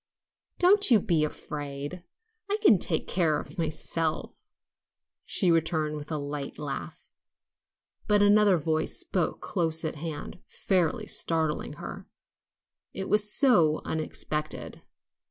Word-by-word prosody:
"Don't 395 +1 +4
you 230 -4 +6
be 170 -6 +1
afraid. 145 +2 -6 0.5
I 410 - +1
can 215 - +6
take 160 -2 0
care 165 -5 +1
of 195 - -10
myself," 160 0 -2 0.9
she 180 -3 +2
returned 160 -2 0
with 150 +1 -8
a 155 - -1
light 145 -1 -5
laugh. 135 - -7 1.0
But 205 -1 +4
another 205 -2 +5
voice 155 0 -1
spoke 175 -4 -1
close 165 -3 0
at 155 - -4
hand, 160 +2 -7
fairly 180 -5 -1
startling 160 -2 -1
her, - - -9 0.9
it 190 - -4
was 210 0 +5
so 175 - +4
unexpected. 155 -1 -3
160 Hz, 120 wpm, -27 LUFS, 150-190 Hz, 1.0 s, you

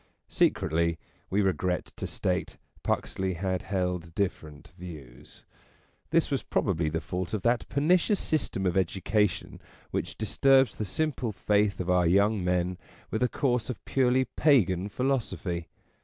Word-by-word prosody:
Secretly, 85 +1 +1 0.3
we 100 +2 +2
regret 90 -1 -1
to - - -4
state, - - -2 0.2
Puxley 95 -1 -1
had 95 +1 -1
held 90 -3 -2
different 80 -7 -3
views. 75 -9 -11 0.7
This - - +2
was - - +1
probably 80 -1 0
the 80 +1 -1
fault 90 +4 -3
of 105 - -4
that 120 0 +1
pernicious 175 +7 +3
system 125 -11 -1
of 90 - +2
edu 95 0 0
cation 105 -4 0 0.3
which - - -3
disturbs 135 +4 +3
the 105 - -2
simple 130 +1 -1
faith 105 0 +1
of 90 - -3
our 90 -1 +3
young 100 +3 +3
men 90 0 0 0.3
with 110 - -1
a 125 - +3
course 125 -4 0
of 125 - -6
purely 130 0 +2
Pagan 100 - +2
philosophy. 105 -8 -2
95 Hz, 140 wpm, -28 LUFS, 90-120 Hz, 0.7 s, pernicious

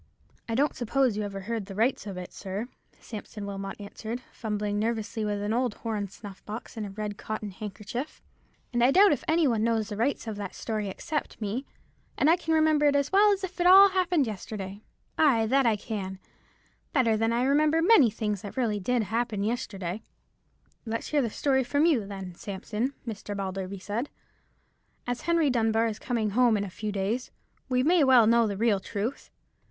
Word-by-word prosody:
"I 225 - 0
don't 285 +4 +2
suppose 250 -1 +1
you 210 - -2
ever 200 -1 -4
heard 220 0 -4
the 195 - -8
rights 225 +1 +1
of 195 -2 -6
it, 180 -1 -7
sir," 200 +4 -5 0.3
Sampson 210 -1 -8
Wilmot 195 0 -6
answered, 220 +4 -6
fumbling 210 -2 -2
nervously 220 0 -2
with 205 -1 -1
an 210 +1 -1
old 245 -2 0
horn 215 -3 -3
snuff 195 0 -11
box 215 +3 -7
and 215 -2 -4
a - - -7
red 205 0 -5
cotton 215 -1 -4
handkerchief, 215 +7 -6 0.5
"and 240 0 +2
I 250 - +6
doubt 390 +7 +6
if 290 - 0
any 320 -1 +3
one 225 -4 +1
knows 225 -2 +1
the 210 - -4
rights 245 +4 0
of 220 -2 -5
that 200 -2 -6
story 215 -3 -3
except 300 +10 -4
me, 225 +5 -3 0.5
and 305 - +4
I - - +6
can 325 -2 -1
remember 310 -2 +4
it 285 - +3
as 285 0 +1
well 410 +2 +6
as 395 -1 -1
if 370 -1 -4
it 350 - +4
all 390 +2 +9
happened 360 -6 +2
yesterday—ay, 215 +5 -1
that 265 +2 +3
I 225 - +4
can—better 215 - -4
than 225 +1 +1
I 235 +1 +1
remember 300 +4 +3
many 330 - +6
things 210 -2 -3
that 205 +5 -9
really 220 -5 +1
did 240 +4 +1
happen 220 0 -1
yesterday." 205 -4 -3 0.8
"Let's 230 0 -4
hear 295 -2 +2
the 235 - -1
story 265 +3 +1
from 285 +5 +2
you, 260 -12 +2
then, 195 -3 -7
Sampson," 210 +8 -4
Mr. 205 -2 -5
Balderby 195 0 -4
said. 210 +8 -3 1.0
"As 245 0 -3
Henry 330 -4 +3
Dunbar 225 -1 +2
is 220 -2 -3
coming 225 -4 -1
home 235 0 +4
in 200 - -1
a 195 - -6
few 215 +3 -4
days, 205 +5 -2 0.4
we 255 0 +2
may 345 +5 +4
as 290 - +5
well 255 -4 +7
know 230 0 +4
the 200 -2 -3
real 215 -2 +2
truth. 220 +7 -4
225 Hz, 195 wpm, -28 LUFS, 205-265 Hz, 1.0 s, all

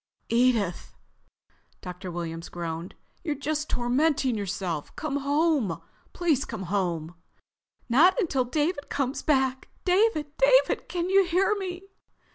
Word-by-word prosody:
"Edith," 230 -7 +1 0.9
Dr. 180 +1 -7
Williams 165 -1 -5
groaned. 170 0 -5 0.3
"You're 305 -3 -1
just 300 +2 -2
tormenting 260 +1 +1
yourself. 185 -6 -4
Come 295 -2 -2
home. 285 - +1 0.3
Please 315 -6 +1
come 220 -4 -6
home." 175 -4 -2 0.7
"Not 320 - +5
until 305 - +1
David 295 +4 -1
has - - -33
come 270 -2 -1
back.... 265 -3 +1 0.2
David, 360 -6 +2
David, - - +4
can 355 +1 -2
you 390 0 +5
hear 370 +4 +2
me?" 375 -3 -5
270 Hz, 120 wpm, -27 LUFS, -, 0.9 s, Not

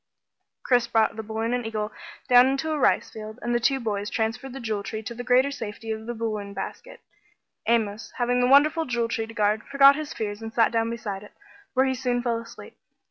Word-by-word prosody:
Chris 245 -2 +3
brought 225 -2 +2
balloon 220 +1 -3
and 245 0 -1
eagle 215 -1 -3 0.4
down 245 0 +7
into 275 +4 -1
a 305 - -1
rice - - +2
field, 215 0 -8
and 240 - -1
the 240 - +2
two 270 +3 +2
boys 210 -3 -2
transferred 225 +4 -2
the 270 - -7
Jewel 220 -4 -2
Tree 220 +2 -5
to 225 - -6
the 245 +1 -6
greater 255 +3 +3
safety 225 -3 -6
of 220 +1 -5
the 240 - -3
balloon 215 -3 -4
basket. 195 - -7 0.7
Amos, 220 -2 0
having 245 0 +1
the 245 - +3
wonderful 305 +5 +5
Jewel 235 -3 -1
Tree 225 -1 -2
to 225 - -10
guard, 210 0 +2
forgot 275 0 +6
his 310 0 -5
fears 205 -1 -4
and 225 0 -6
sat 230 -1 +3
down 230 0 +1
beside 210 -4 -5
it, 210 - -14 0.4
where 260 +1 +4
he 265 - +1
soon 250 -1 -1
fell 235 -2 0
asleep. 230 - -12
230 Hz, 215 wpm, -25 LUFS, 220-250 Hz, 0.7 s, down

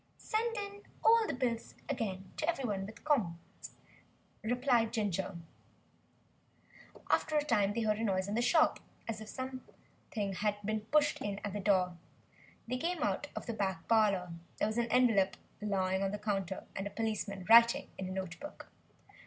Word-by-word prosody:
"Send 455 +1 -1
in 405 0 -5 0.2
all 450 -1 +6
the - - -1
bills 240 -2 -2
again 195 -8 -3
to 315 - 0
everybody 220 - -1
'with 220 +3 -11
comp'ts,'" 200 - -2 0.7
replied 245 -1 +2
Ginger. 195 -4 -1 1.7
After 310 -1 +2
a 295 - +3
time 205 -8 +2
they 230 - -1
heard 215 -1 +1
a - - -1
noise 190 -3 +1
in 205 - -3
the 235 - +2
shop, 310 +6 +4 0.3
as 220 -1 -3
if 215 - -8
something 255 -5 -6
had 205 +2 0
been 215 0 0
pushed 295 +4 +2
in 200 -1 -2
at 205 - -3
the 205 - -2
door. 185 -3 +2 0.7
They 250 +2 -1
came 335 +3 -1
out 290 - 0
of - - -5
the 235 - -3
back 190 -6 -2
parlour. 200 -6 +3 0.3
There - - +1
was 220 +2 -1
an 235 0 0
envelope 225 -7 +4 0.2
lying 190 -2 0
on 195 - +1
the 205 - -3
counter, 195 -3 -2
and 195 +1 -2
a - - -4
policeman 205 -3 -3
writing 235 +1 +7
in 190 - -3
a - - -5
note 185 -3 -4
book! 295 +1 -10
215 Hz, 170 wpm, -33 LUFS, 195-255 Hz, 1.7 s, writing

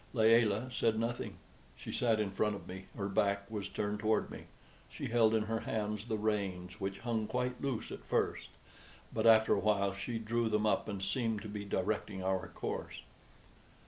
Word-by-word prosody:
Layelah 115 0 +4
said 115 -3 +1
nothing. 115 +2 -2 0.4
She - - -7
sat 115 -3 +2
in 105 -2 0
front 105 +1 +1
of - - -9
me; 95 +1 -7
her 100 -2 -1
back 100 0 +1
was 100 -2 -3
turned 105 +1 -2
toward 110 0 +1
me; - - -8 0.4
she - - -5
held 115 -1 +4
in 110 - +2
her 110 +1 -1
hands 105 -1 -2
the 110 -2 -1
reins, 100 -3 -2
which 95 0 -3
hung 115 -2 -1
quite 125 0 -2
loose 135 -5 -2
at - - -7
first, - - 0 0.6
but - - +2
after 110 -1 +7
a - - +2
while 100 -2 +2
she 100 +4 -3
drew 115 +1 0
them 105 0 +2
up, 105 - +2
and 100 -2 -4
seemed 115 -3 0
to - - -6
be 105 -1 -5
directing 100 0 -1
our 95 0 0
course. - - -5
105 Hz, 185 wpm, -34 LUFS, 100-115 Hz, 0.6 s, after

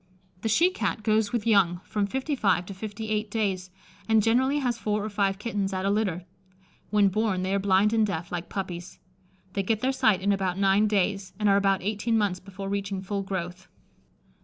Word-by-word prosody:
The 225 - -1
she 340 - +4
Cat 235 - -2
goes 215 -1 +2
with 235 -3 -1
young 195 -6 +3
from 205 -1 -1
fifty 265 +7 -2
five 190 -7 +1
to 195 - -7
fifty 215 +2 -6
eight 215 0 -1
days, 195 -4 -1 0.4
and 220 -1 +4
generally 260 +6 +2
has 245 -5 -1
four 210 -1 -1
or 215 - -5
five 195 -1 +1
kittens 205 -2 -2
at 185 0 -2
a 200 - +2
litter. 190 -5 -1 0.6
When 205 -1 +4
born, 195 -2 0
they 190 +1 -1
are 200 - +2
blind 200 +2 +3
and 225 -1 +3
deaf, 175 -5 -3
like 175 -1 -4
puppies. 180 -3 -5 0.6
They 200 - 0
get 215 +2 -1
their 260 - +2
sight 215 -7 +2
in 200 - +3
about 190 -2 0
nine 200 +2 +3
days, 195 -2 0
and 210 0 +1
are 200 - +5
about 195 -2 +2
eighteen 220 +3 0
months 200 -4 0
before 195 +1 -8
reaching 200 -1 -3
full 200 +1 -2
growth. 190 -1 -5
200 Hz, 205 wpm, -26 LUFS, 190-215 Hz, 0.6 s, are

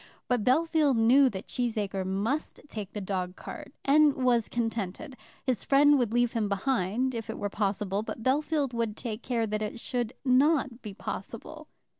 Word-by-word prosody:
But 245 -4 +1
Bellfield 305 +1 +3
knew 255 +5 +6
that 195 -4 -6
Cheesacre 210 -6 -2
must 210 +11 -2
take 210 -7 -6
the 210 - -5
dog 185 -2 -3
cart, - - -9
and 295 +1 +5
was 245 -3 +2
contented. 230 +3 -3 0.3
His 250 -6 0
friend 285 +1 +5
would 235 -4 0
leave 240 0 +2
him 220 -4 -1
behind, 230 +3 0
if 225 -2 -5
it - - -4
were 205 - -3
possible, 200 -1 -1
but 225 +1 -6
Bellfield 285 0 +1
would 230 -2 -2
take 225 -2 -5
care 235 -3 0
that 215 0 -2
it 215 +2 -4
should 240 -1 -2
not 265 -1 +3
be 205 -3 -8
possible. - - -7
235 Hz, 170 wpm, -28 LUFS, 210-265 Hz, 0.3 s, knew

